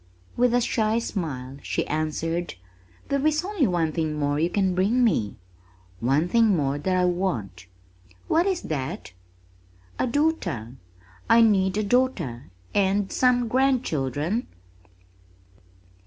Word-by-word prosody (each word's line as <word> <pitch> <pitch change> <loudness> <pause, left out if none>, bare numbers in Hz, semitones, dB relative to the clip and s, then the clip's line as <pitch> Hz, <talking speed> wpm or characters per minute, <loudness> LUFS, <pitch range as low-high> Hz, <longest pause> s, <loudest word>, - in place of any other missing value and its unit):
With 245 0 +3
a 245 - +3
shy 220 -1 +1
smile 140 - -4
she - - -2
answered, 160 - -2 0.5
"There 280 -1 0
is 310 +3 +1
only 385 -9 +1
one 170 -4 0
thing 155 -1 -2
more 145 0 0
you 165 +2 +1
can 190 -1 +1
bring 205 +8 +2
me, 150 - +1 0.6
one 135 +8 +1
thing 220 -1 +3
more 140 -1 -1
that 185 +5 0
I 180 - +3
want." 120 - -2 0.6
"What 335 +4 +2
is 375 -3 -1
that?" 150 - -4 0.9
"A - - +1
daughter. 215 - -1 0.6
I 230 - +7
need 195 -3 +3
a 215 - +1
daughter 200 - 0 0.2
and 195 0 +1
some 245 -1 +2
grandchildren." 220 - 0
190 Hz, 125 wpm, -25 LUFS, 150-235 Hz, 0.9 s, I